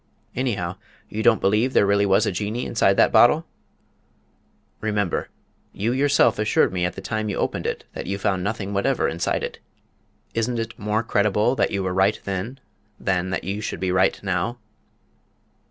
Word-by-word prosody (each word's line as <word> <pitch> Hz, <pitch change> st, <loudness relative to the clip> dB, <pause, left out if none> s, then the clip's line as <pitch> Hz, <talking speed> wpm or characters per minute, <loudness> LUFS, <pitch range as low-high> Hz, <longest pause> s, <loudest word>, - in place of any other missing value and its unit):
"Anyhow, 100 Hz, -8 st, -2 dB, 0.3 s
you 110 Hz, -, -3 dB
don't 110 Hz, 0 st, +4 dB
believe 110 Hz, +6 st, +2 dB
there -, -, +4 dB
really 100 Hz, 0 st, +3 dB
was 95 Hz, -, +4 dB
a -, -, 0 dB
Jinnee 105 Hz, +6 st, -3 dB
inside 100 Hz, -4 st, +2 dB
that -, -, +5 dB
bottle?" 120 Hz, +8 st, +5 dB, 1.3 s
"Remember, 105 Hz, -4 st, -1 dB, 0.4 s
you 110 Hz, +4 st, -1 dB
yourself 130 Hz, -4 st, +3 dB
assured 105 Hz, -3 st, +2 dB
me 90 Hz, -1 st, 0 dB
at 90 Hz, -, -3 dB
the -, -, -7 dB
time 110 Hz, -1 st, -2 dB
you 100 Hz, -, -3 dB
opened -, -, -1 dB
it -, -, -3 dB
that -, -, -6 dB
you 100 Hz, +1 st, -2 dB
found 95 Hz, -2 st, 0 dB
nothing 100 Hz, -1 st, -3 dB
whatever 125 Hz, +7 st, +1 dB
inside 85 Hz, +2 st, -1 dB
it. -, -, -5 dB, 0.7 s
Isn't 115 Hz, +1 st, -1 dB
it 115 Hz, 0 st, -5 dB
more 105 Hz, +2 st, 0 dB
credible 105 Hz, +3 st, +2 dB
that -, -, +1 dB
you 100 Hz, -1 st, -2 dB
were 90 Hz, -1 st, -1 dB
right 95 Hz, +3 st, +2 dB
then 100 Hz, +7 st, -4 dB, 0.4 s
than 95 Hz, -1 st, 0 dB
that 95 Hz, -, -2 dB
you 100 Hz, +2 st, -3 dB
should 100 Hz, -5 st, -4 dB
be 95 Hz, 0 st, -1 dB
right 95 Hz, +1 st, +2 dB
now?" 95 Hz, +5 st, -1 dB
105 Hz, 175 wpm, -23 LUFS, 95-115 Hz, 1.3 s, that